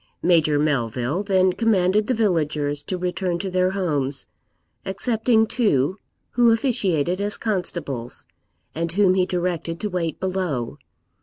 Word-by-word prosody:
Major 160 -4 +4
Melville 135 - 0
then 190 -2 +2
commanded 210 -1 +2
the 255 - +1
villagers 150 -8 0
to 185 - -3
return 180 0 -1
to 190 +1 -4
their 185 0 +2
homes, 145 - -1 0.6
excepting 220 +3 +1
two, 190 - +1 0.3
who 240 -1 +4
officiated 195 - +1
as 205 +1 -1
constables, 170 - -3 0.5
and 165 +1 -2
whom 190 0 +4
he 185 -1 +2
directed 175 -2 -2
to 210 - -2
wait 170 -3 -2
below. 180 -11 -2
180 Hz, 130 wpm, -23 LUFS, 150-200 Hz, 0.6 s, Major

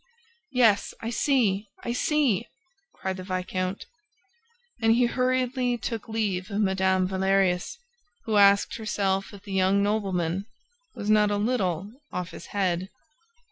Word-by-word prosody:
"Yes, 230 -6 +3
I 230 - -3
see! 225 -6 +1 0.2
I 235 - -2
see!" 250 -5 +1 0.5
cried 190 0 -4
the 185 - -6
viscount. 185 +1 -3 1.0
And 225 0 +4
he 245 +1 +4
hurriedly 255 0 0
took 230 0 -5
leave 205 -4 -1
of 200 0 -2
Mme. 190 -2 +2
Valerius, 190 - +1 0.5
who 220 -2 +1
asked 200 0 +5
herself 195 -3 -1
if 200 -2 -13
the 200 -2 -7
young 190 +1 +3
nobleman 195 -3 -1 0.5
was 210 +1 -1
not 210 -1 +5
a 205 - 0
little 205 -4 -1 0.2
off 180 0 -4
his 170 - -10
head. 185 -2 -1
200 Hz, 135 wpm, -26 LUFS, 190-225 Hz, 1.0 s, asked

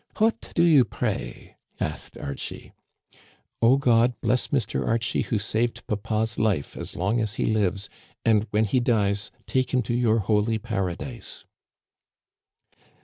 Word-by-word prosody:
What 225 +1 +1
do 170 - +4
you 155 -6 +6
pray? - - -4
" - - -38
asked - - -4
Archie. 70 -1 -6 0.9
O 120 +4 +6
God, 120 -2 +3
bless 125 - +1
Mr. 120 -7 -1
Archie, 115 0 0
who 115 - -1
saved 110 +3 -1
papa's 110 +1 -1
life, 100 -10 0
as - - -7
long 100 +7 0
as 110 -1 -2
he - - 0
lives; 100 -2 0 0.4
and, 110 -1 +3
when 110 +1 +2
he 125 +5 +2
dies, 105 -4 +1 0.2
take 130 -1 0
him 125 - +2
to 115 - -2
your 120 -2 +3
holy 105 +1 +1
paradise." 110 +2 -5
110 Hz, 145 wpm, -25 LUFS, 105-120 Hz, 0.9 s, you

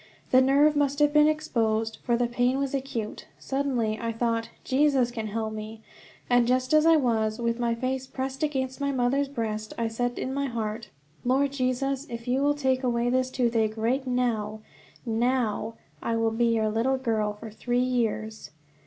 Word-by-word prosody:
The 255 - +7
nerve 285 +3 +4
must 285 -1 +1
have 295 0 +3
become 300 0 +6
exposed, 225 -8 0
for 235 -2 +1
the 245 - +2
pain 245 +2 +1
was 275 -1 -2
acute. 260 -6 -4
Suddenly 255 -6 -1
I 230 0 -1
thought, 230 0 -1
"Jesus 265 -3 +2
can 225 -3 -4
help 220 +1 -3
me," 215 +1 -7 0.5
and 245 -1 +4
just 255 +2 +1
as 310 +1 +5
I 330 - +7
was, 225 -6 +1
with 235 0 -1
my 235 -1 +1
face 260 +2 -2
pressed 265 +1 -4
against 265 -3 -2
my 280 0 +1
mother's 265 +2 +1
breast, 215 -5 -4
I 230 - 0
said 245 +2 -2
in 260 - -3
my 280 0 -1
heart: 230 -1 -4 0.3
"Lord 270 +3 +2
Jesus, 270 +1 -1
if 235 0 -7
you 255 +2 +1
will 290 +1 +2
take 265 -3 +1
away 240 -1 +1
this 255 0 +1
toothache 230 -4 0
right 255 +5 0
now, 225 -4 -1 0.4
now, 230 -1 0 0.3
I 230 - -1
will 225 0 +1
be 230 +2 +1
your 225 -2 +2
little 235 +5 +1
girl 220 -4 0
for 215 +1 -10
three 240 +3 -3
years." 230 -3 -1
245 Hz, 180 wpm, -27 LUFS, 225-265 Hz, 0.5 s, The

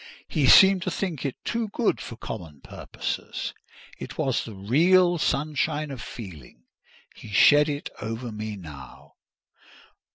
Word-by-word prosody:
He 145 -4 +1
seemed 190 +5 +8
to 185 - -2
think 170 -6 -3
it 135 - -5
too 230 -1 -1
good 215 +2 0
for 115 - -7
common 85 - -8
purposes: - - -5 0.5
it - - -8
was 130 -3 0
the 110 - -9
real 175 - +3
sunshine 150 +1 -1
of 130 -4 -7
feeling—he 85 - -13
shed 145 +8 +5
it 145 0 -4
over 115 +2 -5
me 105 0 -5
now. 75 -9 -12
135 Hz, 130 wpm, -25 LUFS, 105-160 Hz, 0.5 s, seemed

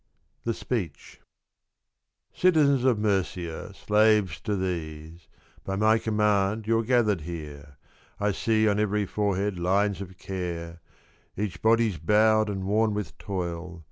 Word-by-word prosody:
THE 115 -1 0
SPEECH. 90 - -5 0.5
' - - -55
Citizens 145 -7 +3
of 125 -4 +4
Murcia, 95 -4 -2
slaves 105 -5 +2
to 105 - -1
these, 80 -3 -5 0.2
— - - -30
By 95 - -3
my 110 +2 +3
command 105 -1 +1
you 115 +1 +2
're - - 0
gathered 110 -6 +2
here. 75 -3 -8 0.4
I 105 0 +1
see 110 +2 +1
on 105 0 +2
every 105 -1 +1
forehead 100 -1 -1
lines 100 +3 +1
of 95 -1 -9
care; 85 -3 -5 0.6
Each 95 -4 -3
body's 110 -5 +2
bowed 110 +4 +3
and 95 -2 -3
worn 105 +2 +1
with 105 -1 -4
toil. 90 -3 -5
100 Hz, 140 wpm, -26 LUFS, 90-110 Hz, 0.6 s, of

